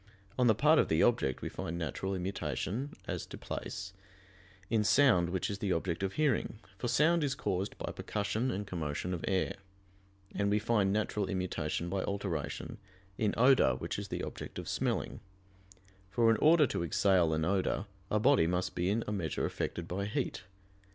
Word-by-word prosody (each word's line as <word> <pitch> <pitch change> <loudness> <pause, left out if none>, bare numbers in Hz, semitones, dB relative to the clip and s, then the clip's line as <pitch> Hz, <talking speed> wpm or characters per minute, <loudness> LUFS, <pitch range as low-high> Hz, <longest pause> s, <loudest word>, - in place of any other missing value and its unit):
On 125 - +5
the 110 - +5
part 150 +7 +5
of - - +3
the 80 +1 +3
object 115 - +2
we - - -2
find 85 +1 -5
natural 85 +4 -3
immutation, 95 - -3
as - - -3
to - - -8
place, 95 -1 -6 0.7
in 110 0 +2
sound 105 -8 +4
which 95 0 -1
is 100 -1 -4
the 100 -2 -1
object 85 0 -1
of 95 0 -1
hearing; 140 -7 +1 0.2
for 120 - -2
sound 160 +6 +3
is 135 -2 0
caused 100 -6 -2
by - - -4
percussion 110 +4 -2
and 105 -3 -2
commotion 85 -1 -3
of 85 - -4
air: 95 0 0 0.8
and 100 0 0
we 105 - +3
find 105 -2 +2
natural 105 -1 0
immutation 90 -3 -2
by 95 +2 -1
alteration, 100 - -3 0.4
in 105 -2 +1
odor 125 - +5
which - - -4
is - - -5
the - - -4
object - - -7
of - - -6
smelling; - - -1 0.9
for 115 +3 +4
in 110 - +3
order 155 0 +6
to 100 - -2
exhale 90 0 +3
an 80 0 0
odor, 95 +2 0 0.2
a 105 - +2
body 130 -7 +4
must 90 +1 -1
be 90 +1 0
in 110 +3 +1
a - - -3
measure 90 -7 -1
affected 85 -1 -3
by 95 +3 -2
heat. 125 -2 -3
100 Hz, 180 wpm, -32 LUFS, 90-115 Hz, 0.9 s, order